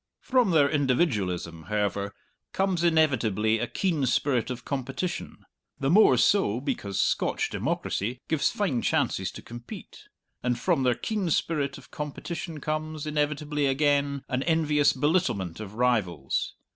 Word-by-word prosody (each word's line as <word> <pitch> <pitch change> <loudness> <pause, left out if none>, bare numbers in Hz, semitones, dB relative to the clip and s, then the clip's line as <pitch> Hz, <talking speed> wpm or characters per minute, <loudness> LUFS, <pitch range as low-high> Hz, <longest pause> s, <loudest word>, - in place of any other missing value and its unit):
From 250 -5 +2
their 155 -5 +5
individualism, 105 - 0
however, 100 -1 -1 0.4
comes 190 -3 0
inevitably 115 - +2
a 120 - -1
keen 160 - 0
spirit 125 -2 +1
of 125 -1 -6
competition 140 +6 -4 0.3
(the 140 +1 +1
more 210 +5 +6
so 190 - +3
because 125 - -3
Scotch - - +1
democracy 115 +6 -2
gives 160 -3 +2
fine 150 - -1
chances - - 0
to - - -10
compete), 120 0 -10 0.4
and 125 -1 0
from - - +1
their 125 -2 +2
keen 210 -5 -2
spirit 150 -3 0
of - - -16
competition 155 +2 -5
comes, 155 0 -3
inevitably 150 -1 0
again, 140 0 +1
an 130 0 -1
envious 150 -2 +3
belittlement 130 - 0
of 105 -1 -8
rivals. 105 - 0
140 Hz, 130 wpm, -27 LUFS, 120-155 Hz, 0.4 s, more